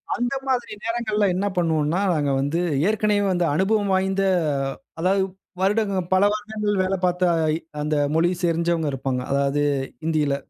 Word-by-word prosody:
அந்தமாரி 245 Hz, -1 st, -2 dB
நேரங்கள்ல 225 Hz, -2 st, 0 dB
என்ன 195 Hz, -, -1 dB
பண்ணுவோன்னா 160 Hz, 0 st, +1 dB
நாங்க 145 Hz, -3 st, 0 dB
வந்து 145 Hz, +5 st, -1 dB, 0.3 s
ஏற்கனவே 210 Hz, -1 st, +1 dB
அந்த 175 Hz, -, +1 dB
அனுபவம் 200 Hz, +3 st, +1 dB
வாய்ந்த 190 Hz, +1 st, +1 dB, 0.8 s
அதாவது 190 Hz, +2 st, +2 dB, 0.4 s
வருடங்கள் 195 Hz, -3 st, 0 dB
பல 185 Hz, -, +4 dB
வருடங்கள் 210 Hz, -1 st, -2 dB
வேல 190 Hz, +1 st, 0 dB
பாத்த 180 Hz, 0 st, 0 dB, 0.6 s
அந்த 150 Hz, +1 st, -1 dB, 0.2 s
மொழி 165 Hz, +2 st, +3 dB
தெரிஞ்சவங்க 170 Hz, -1 st, +1 dB
இருப்பாங்க. 130 Hz, -1 st, -2 dB
அதாவது 140 Hz, +1 st, +1 dB, 0.4 s
ஹிந்தியில. 155 Hz, -3 st, +1 dB
185 Hz, 125 wpm, -23 LUFS, 160-210 Hz, 0.8 s, பல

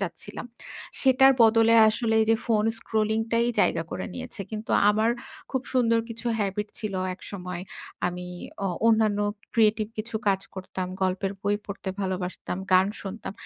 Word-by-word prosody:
চাচ্ছিলাম, 195 Hz, +4 st, -6 dB, 0.5 s
সেটার 265 Hz, 0 st, +6 dB
বদলে 225 Hz, 0 st, +5 dB
আসলে 220 Hz, +1 st, 0 dB
এইযে, 225 Hz, +1 st, +3 dB
ফোন 215 Hz, -2 st, +2 dB
স্ক্রলিং 220 Hz, 0 st, 0 dB
টাই 230 Hz, +1 st, +3 dB
জায়গা 165 Hz, -, +2 dB
করে 185 Hz, -, -4 dB
নিয়েছে। 250 Hz, -4 st, -7 dB
কিন্তু 215 Hz, 0 st, -6 dB, 0.2 s
আমার 220 Hz, +2 st, +2 dB, 0.4 s
খুব 260 Hz, -1 st, -1 dB
সুন্দর 230 Hz, -3 st, +3 dB
কিছু 230 Hz, +1 st, -8 dB
হেবিট 205 Hz, +1 st, -1 dB
ছিলো 200 Hz, -4 st, -3 dB
একসময়। 180 Hz, -2 st, -7 dB, 0.4 s
আমি 180 Hz, 0 st, -4 dB, 0.4 s
অ -, -, +2 dB, 0.2 s
অন্যান্য 220 Hz, -2 st, +3 dB, 0.4 s
ক্রিয়েটিভ 215 Hz, -1 st, +3 dB
কিছু 225 Hz, +2 st, -5 dB
কাজ 195 Hz, -1 st, +2 dB
করতাম, 185 Hz, -1 st, -5 dB, 0.2 s
গল্পের 190 Hz, +1 st, 0 dB
বই 205 Hz, +1 st, +1 dB
পড়তে 200 Hz, -, -3 dB, 0.3 s
ভালোবাসতাম, 185 Hz, -1 st, -3 dB
গান 185 Hz, +1 st, +6 dB, 0.2 s
শুনতাম। 195 Hz, 0 st, -6 dB
215 Hz, 145 wpm, -26 LUFS, 190-225 Hz, 0.5 s, সেটার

